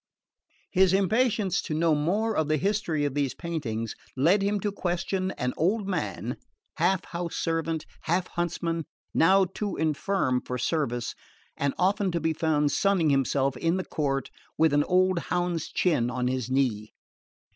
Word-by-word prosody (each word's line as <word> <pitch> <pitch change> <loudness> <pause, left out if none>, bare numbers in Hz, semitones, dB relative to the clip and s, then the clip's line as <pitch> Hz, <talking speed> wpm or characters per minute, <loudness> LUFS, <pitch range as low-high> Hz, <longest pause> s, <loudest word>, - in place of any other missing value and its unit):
His 190 -1 +4
impatience 200 0 +2
to 155 - -4
know 165 0 +3
more 200 +9 +1
of 155 - +1
the 155 0 +2
history 180 -5 0
of 145 - -1
these 140 -2 -1
paintings 120 -10 -3 0.2
led 170 +10 +4
him 200 +1 +1
to 205 - -1
question 185 0 -1
an 125 -1 -2
old 195 +5 +1
man, 130 - -3 0.4
half 190 -1 +2
house 170 -1 -4
servant, 165 -1 -1 0.2
half 175 +3 +1
huntsman, 170 -1 -2 0.3
now 190 +3 +5
too 200 +3 -4
infirm 155 -4 0
for 125 - -4
service 120 -4 -1 0.4
and 140 -1 -1
often 195 +2 +2
to 170 - +1
be 160 0 0
found 155 -3 +1
sunning 190 -6 +2
himself 135 0 +1
in 165 +8 0
the 185 - -3
court 135 -3 -2 0.3
with 160 -2 +4
an 145 0 +4
old 185 0 +3
hound's 175 -3 -1
chin 150 -10 +1
on 125 0 -1
his 130 -1 -2
knee. 120 -6 0
165 Hz, 155 wpm, -27 LUFS, 140-185 Hz, 0.4 s, now